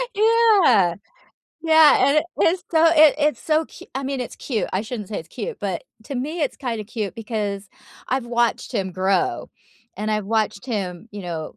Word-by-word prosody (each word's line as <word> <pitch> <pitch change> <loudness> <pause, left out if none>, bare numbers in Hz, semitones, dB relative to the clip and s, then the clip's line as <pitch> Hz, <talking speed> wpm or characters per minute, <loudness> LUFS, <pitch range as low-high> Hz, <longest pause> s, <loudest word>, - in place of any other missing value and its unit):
Yeah, 425 - +4 0.7
yeah, 320 -1 +6
and 290 - +2
it 325 - -1 0.2
is 350 +2 +2
so 325 0 +4
it 310 -2 +6
it's 295 -5 +1
so 315 0 +1
cu - - -14
I 270 - -3
mean, 270 -1 -3
it's 245 - -6
cute, 230 -6 -3
I 190 - 0
shouldn't 220 -3 -6
say 210 - -4
it's 160 - -10
cute, 230 -5 -6
but 190 -4 -3 0.2
to 275 - -6
me, 300 +7 -3
it's 280 - -2
kinda 230 -5 -4
cute 210 -2 -5
because, 210 -3 -4 0.4
I've 255 -1 -1
watched 240 +1 0
him 190 -4 -2
grow, 185 -10 0 0.5
and 215 +1 -3
I've 210 -2 -1
watched 220 +1 -1
him, 200 -3 -4
you 205 -2 -8
know, 165 -3 -6
230 Hz, 185 wpm, -22 LUFS, 200-300 Hz, 0.7 s, yeah